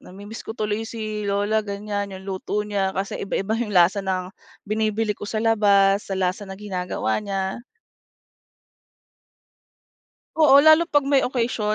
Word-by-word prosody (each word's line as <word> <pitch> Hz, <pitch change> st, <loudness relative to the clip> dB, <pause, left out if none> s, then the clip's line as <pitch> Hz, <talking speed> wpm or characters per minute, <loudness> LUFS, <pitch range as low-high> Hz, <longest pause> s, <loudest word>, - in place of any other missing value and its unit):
namimiss 205 Hz, +4 st, -10 dB
ko -, -, -5 dB
tuloy 215 Hz, 0 st, -2 dB
si 215 Hz, -2 st, -5 dB
lola 205 Hz, +2 st, +1 dB
ganyan 205 Hz, 0 st, -4 dB
yung 190 Hz, -, -12 dB
luto 195 Hz, +2 st, -3 dB
niya 200 Hz, -2 st, -1 dB
kasi 195 Hz, +1 st, -2 dB
iba-iba 195 Hz, +2 st, -2 dB
yung 220 Hz, -3 st, -3 dB
lasa 180 Hz, +4 st, +5 dB
ng 185 Hz, -1 st, -2 dB, 0.4 s
binibili 215 Hz, 0 st, 0 dB
ko 205 Hz, -, -9 dB
sa 220 Hz, -, -2 dB
labas, 200 Hz, -3 st, +3 dB
sa 195 Hz, -, -2 dB
lasa 190 Hz, +2 st, -2 dB
ng 190 Hz, -, -7 dB
ginagawa 185 Hz, -, -2 dB
niya. 195 Hz, 0 st, -3 dB, 2.8 s
Oo 285 Hz, -3 st, +7 dB
lalo 315 Hz, +2 st, +6 dB
pag 290 Hz, -3 st, +2 dB
may 275 Hz, 0 st, +2 dB
occasion 230 Hz, -4 st, -1 dB
205 Hz, 145 wpm, -23 LUFS, 195-220 Hz, 2.8 s, Oo